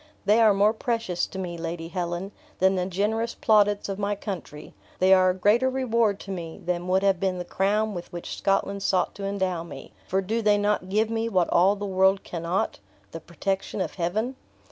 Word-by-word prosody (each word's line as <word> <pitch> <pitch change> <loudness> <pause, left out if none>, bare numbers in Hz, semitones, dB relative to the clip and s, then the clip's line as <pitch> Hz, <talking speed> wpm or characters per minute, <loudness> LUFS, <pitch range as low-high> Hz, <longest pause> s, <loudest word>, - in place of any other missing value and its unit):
They 215 +3 +4
are 220 -2 +6
more 205 +2 +3
precious 225 -6 -2
to - - -9
me, 175 -3 -5
Lady 165 0 -5
Helen, 175 +1 -3 0.3
than 190 +1 +3
the 180 -1 -1
generous 215 +5 -1
plaudits 205 -2 +3
of 195 0 -4
my 205 0 0
country; 185 -7 -7 0.2
they 185 +1 +5
are 185 -1 +5
a - - +2
greater 215 +7 +3
reward 235 -6 +1
to 195 - -7
me 170 -3 -6
than 175 0 -2
would 190 +1 +2
have 195 -2 +3
been 190 -1 0
the 180 - -5
crown 210 +4 0
with 175 -2 -7
which 175 -1 -6
Scotland 195 0 0
sought 185 -2 +1
to 200 - -6
endow 190 -3 -1
me, 170 - -10
for 190 - +1
do 225 +5 -1
they 210 -1 +4
not 205 -2 0
give 215 +3 +1
me 225 0 -1
what 185 -5 +1
all 190 +4 +4
the 205 0 -5
world 190 0 +2
cannot 170 +2 -2 0.3
the 165 - -6
protection 190 +5 -3
of - - -2
Heaven?" 215 +9 -2
195 Hz, 205 wpm, -25 LUFS, 180-210 Hz, 0.3 s, are